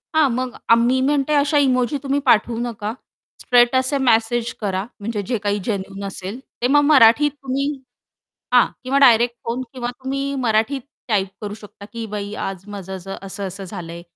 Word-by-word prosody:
हां. 310 -3 +5
मग 255 0 -2 0.2
आ - - +9
मी 240 +3 +2
म्हणते 290 0 +1
अशा 295 +1 +3
इमोजी 255 +2 +1
तुम्ही 275 +1 0
पाठवू 235 -1 +3
नका. 225 -3 -3 0.5
स्ट्रेट 245 0 +4
असे 260 +2 +2
मेसेज 235 -2 +2
करा 190 -2 -1 0.2
म्हणजे 210 0 -3
जे 245 - 0
काही 205 0 0
जेन्युइन 195 -2 -4
असेल. 195 +3 -6 0.2
ते 245 - +3
मग 290 +2 +5
मराठीत 280 +2 +6
तुम्ही 270 +1 -1 0.9
हां. - - +7 0.2
किंवा 265 +2 0
डायरेक्ट 240 -2 +5
फोन 235 +3 -2
किंवा 245 -2 -3
तुम्ही 265 +2 -4 0.2
मराठीत 225 +5 +1 0.3
टाइप 200 -4 +1
करू 205 -1 -5
शकता 210 -1 -13
की 230 -1 -4
"बाई, 205 -1 -5
आज 190 -1 -5
माझं 190 -2 -6
झ 195 +2 -7
असं-असं 195 0 -6
झालंय, 170 -3 -7
235 Hz, 170 wpm, -21 LUFS, 205-260 Hz, 0.9 s, आ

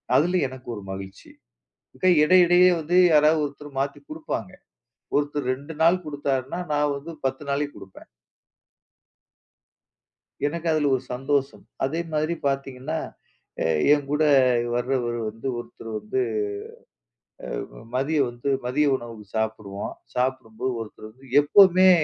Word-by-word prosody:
அதுல 175 +6 +3
எனக்கு 130 -1 -12
ஒரு 105 - -7
மகிழ்ச்சி. 95 0 -9 0.7
மிக - - -5 0.2
இடையிடையே 180 +2 +6
வந்து 160 +3 -1 0.2
யாராவது 155 +1 +5
ஒருத்தர் 145 +1 -9
மாத்தி 140 +1 -2
குடுப்பாங்க. 155 -10 -5 0.7
ஒருத்தர் 145 -2 -1
2 145 +5 -10
நாள் 180 +3 +4
குடுத்தாருன்னா, 140 0 -2
நான் 145 0 +2
வந்து 160 +4 -8
10 135 +2 -1
நாளைக்கு 145 +1 -1
குடுப்பேன். 95 - -13 2.4
எனக்கு 170 +3 -4
அதுல 150 -2 +2
ஒரு 130 - -4
சந்தோஷம். 135 +2 -1 0.2
அதே 160 +5 -2
மாதிரி 155 +2 0
பார்த்தீங்கன்னா, 135 +2 -3 0.7
அ - - -1 0.3
என் 145 -2 0
கூட 150 +1 +1 0.5
வரவரு 120 -1 -1
வந்து 115 +5 -7
ஒருத்தர் 115 -1 -10
வந்து 105 +5 -3 1.6
அ - - -13
மதியம் 140 0 +1
வந்து 120 +4 -4 0.2
மதிய 145 +4 +2
உணவு 115 -3 -10
சாப்பிடுவோம். 110 -2 -3 0.2
சாப்பிடும்போது 130 -1 -1
ஒருத்தர் 110 0 -9
வந்து 130 +4 -20 0.2
எப்பவுமே 185 +4 +6
140 Hz, 120 wpm, -24 LUFS, 125-155 Hz, 2.4 s, இடையிடையே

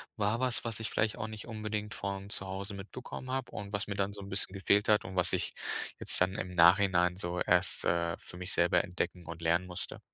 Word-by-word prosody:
war 105 +2 +1
was, 130 -1 +1
was 115 -2 -3
ich 110 - -1
vielleicht 110 +1 0
auch 110 -1 -3
nicht 110 0 -8
unbedingt 110 -1 -3
von 100 0 -4
zu 95 - 0
Hause 95 +1 -4
mitbekommen 125 +6 -8
habe 130 -1 -2
und 100 0 -7
was 100 0 0
mir 100 - -3
dann 100 0 -1
so 100 - -5
'n 100 - -9
bisschen 95 -1 +1
gefehlt 100 +1 +2
hat 105 -1 +4
und 95 0 -7
was 90 - +3
ich - - 0 0.5
jetzt - - +3
dann 95 +1 +2
im 90 -3 -4
Nachhinein 90 0 +5
so 90 -1 -3
erst, 90 +1 +3
äh, 85 0 +1
für 90 - -8
mich 90 +1 -1
selber 85 0 +3
entdecken 90 -1 -4
und 85 0 -8
lernen 85 +2 +1
musste. 90 -1 -2
100 Hz, 230 wpm, -31 LUFS, 90-105 Hz, 0.5 s, Nachhinein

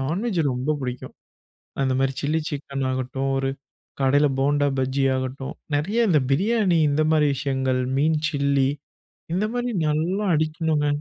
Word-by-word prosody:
Non veg 175 - -1
ரொம்ப 130 +5 -1
புடிக்கும். 125 -1 -5 0.7
அந்த 130 -1 +1
மாரி 135 0 +1
சில்லி 150 +3 0
சிக்கன் 140 -2 -4
ஆகட்டும், 130 +1 -2
ஒரு 135 0 0 0.5
கடையில 145 +2 +4
போண்டா 145 +1 +2
பஜ்ஜி 130 +1 0
ஆகட்டும், 130 +1 -4 0.2
நெறைய 210 +11 +1
இந்த 155 -5 +4
பிரியாணி 195 +2 +2
இந்த 150 +2 +2
மாரி 155 -2 +4
விஷயங்கள். 130 -2 0 0.2
மீன் 155 +2 +2
சில்லி, 140 -2 +1 0.6
இந்த 190 +4 +1
மாரி 245 0 -1 0.2
நல்லா 170 +7 0
அடிக்கணுங்க. 155 -1 0
145 Hz, 135 wpm, -23 LUFS, 135-160 Hz, 0.7 s, கடையில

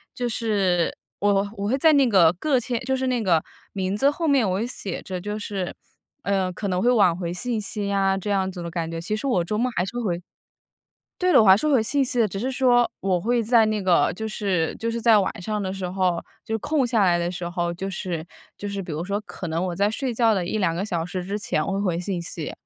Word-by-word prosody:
就 245 -1 -2
是 200 -7 +1 0.2
我 200 -1 +2
我 200 - -2
会 255 +5 +1
在 320 +3 +5
那 275 -3 +5
个 185 -7 +5
个 290 -4 +2
签 245 0 -2
就 265 +2 0
是 260 0 -1
那 250 -2 0
个 170 -6 +2 0.3
名 190 0 -1
字 275 +5 +4
后 330 +3 -3
面 265 -8 +3
我 185 - 0
会 225 - -1
写 205 -6 -5
着 185 -1 -5
就 210 +3 -4
是， 200 -4 -4 0.5
呃， 190 -2 0
可 200 +2 -4
能 180 0 0
会 240 - +3
晚 200 -8 +4
回 175 -2 -3
信 235 +4 -2
息 200 -1 -3
啊， 195 -1 +2
这 195 +2 -4
样 190 -2 +1
子 180 -2 -7
的 170 - -5
感 165 -1 -3
觉， 165 0 -5
其 175 - -3
实 245 +6 -3
我 185 -10 +2
周 210 +5 -2
末 250 +3 +1
还 175 - +1
是 215 +6 -6
会 245 - -2
回 - - -11 1.0
对 365 0 +2
了， - - +7
我 - - +2
还 190 0 +8
是 305 +9 0
回 270 -5 +4
信 275 +5 +1
息 250 -1 -2
的。 225 - +4
只 195 - -5
是 255 +4 -1
说 245 -2 +3
我 185 -2 +1
会 240 +5 +1
在 225 0 +4
那 215 -1 0
个 185 -2 +3
就 220 +4 -4
是 190 -6 -1
就 230 +1 -2
是 235 0 -3
在 230 -1 +5
晚 195 - -1
上 210 +2 -2
的 190 -1 -3
时 190 -2 -4
候， 180 -2 0 0.2
就 225 - -6
是 - - 0
空 290 +4 0
下 230 -4 +2
来 175 -2 +4
的 170 0 -1
时 175 -1 -4
候， 175 0 -2
就 190 +3 -4
是 175 -4 -4 0.3
就 205 - -5
是 200 -1 -4
比 180 - -8
如 155 +3 -3
说 200 +2 -2
可 190 - -7
能 165 +3 -1
我 180 - -3
在 200 +2 +2
睡 255 +3 -2
觉 225 -1 +3
的 185 -3 -1
1、2 185 -4 0
个 180 +4 -2
小 175 -6 -2
时 180 0 -4
之 200 +3 -3
前 155 -6 -1
我 195 - -2
会 195 - -1
回 180 -4 0
信 180 -1 -3
息， 165 -2 -5
200 Hz, 285 characters per minute, -24 LUFS, 180-230 Hz, 1.0 s, 还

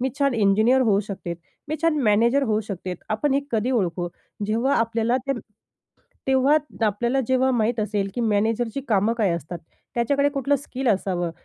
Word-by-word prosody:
मी 260 - +1
छान 275 -3 +2
इंजिनिअर 220 +5 +3
होऊ 210 -5 +3
शकते, 190 -4 -6 0.3
मी 310 - -1
छान 330 -2 +3
मॅनेजर 235 +5 +3
होऊ 215 -4 +1
शकते? 190 -3 -5 0.2
आपण 265 +7 +1
हे 280 - +3
कधी 230 +2 0
ओळखू? 180 -7 0 0.4
जेव्हा 230 +6 +1
आपल्याला 230 +1 +1
ते 275 - +1 0.9
तेव्हा 265 +3 +4 0.3
आपल्याला 240 +6 0
जेव्हा 260 0 +2
माहीत 230 -1 +1
असेल 210 -2 -1
की 245 - -2
मॅनेजरची 225 +3 0
कामं 215 +1 +2
काय 205 -5 +2
असतात. 170 0 -4 0.4
त्याच्याकडे 280 +4 +2
कुठलं 280 0 0
स्किल 265 -1 -4
असावं. 185 -4 0
230 Hz, 160 wpm, -23 LUFS, 205-265 Hz, 0.9 s, तेव्हा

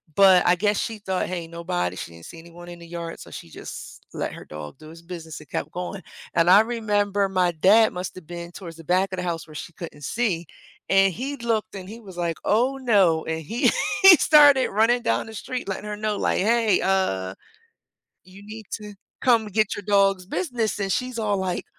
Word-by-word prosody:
but 190 -2 +6
I 180 - +5
guess 205 +3 +1
she 225 -1 -4
thought, 190 -2 -2
"Hey, 175 -2 -4
nobody," 90 - -3
she - - -7
didn't 85 0 -13
see 165 - -11
anyone 170 +1 -13
in 175 0 -10
the 170 - -12
yard, 170 0 -6
so - - -11
she - - -9
just - - -9
let - - -3
her - - -10
dog 75 - -9
do 155 - -14
his 165 +1 -13
business 165 -2 -8
and 150 - -16
kept 150 - -4
going, 180 +2 -5 0.3
and 170 0 +4
I 200 +3 +8
remember 205 -3 0
my 185 -2 +2
dad 200 +7 +4
must've 180 -1 -6
been 170 0 -7
towards 170 -4 -9
the 165 - -12
back 185 +2 +1
of - - -3
the 180 - -3
house 170 -2 -3
where 155 - -13
she 165 - -7
couldn't 155 -4 -9
see, 190 - -1 0.4
and 195 -1 +4
he 275 - -4
looked 225 -3 -2
and 190 -1 -8
he 225 +2 -9
was 190 -4 -12
like, 170 -2 -2
"Oh 250 +6 +2
no," 195 -11 +3
and 160 0 -3
he 225 +11 +1 0.3
he 385 -2 +11
started 290 -4 +6
running 225 +4 +2
down 115 0 0
the 220 - -10
street 250 +4 -5
letting 195 +2 -4
her 210 0 -5
know 215 0 -1
like, - - 0
"Hey, 220 0 +3
uh, 95 - 0 0.9
you 190 +2 -15
need 215 -1 -9
to 210 -1 -8 0.3
come 235 -4 +3
get 215 +1 0
your 205 - -6
dog's 195 -2 +3
business," 235 - -2
and 195 -1 -2
she's 250 +1 -2
all 210 -2 0
like, 185 -2 -2
190 Hz, 215 wpm, -24 LUFS, 170-215 Hz, 0.9 s, he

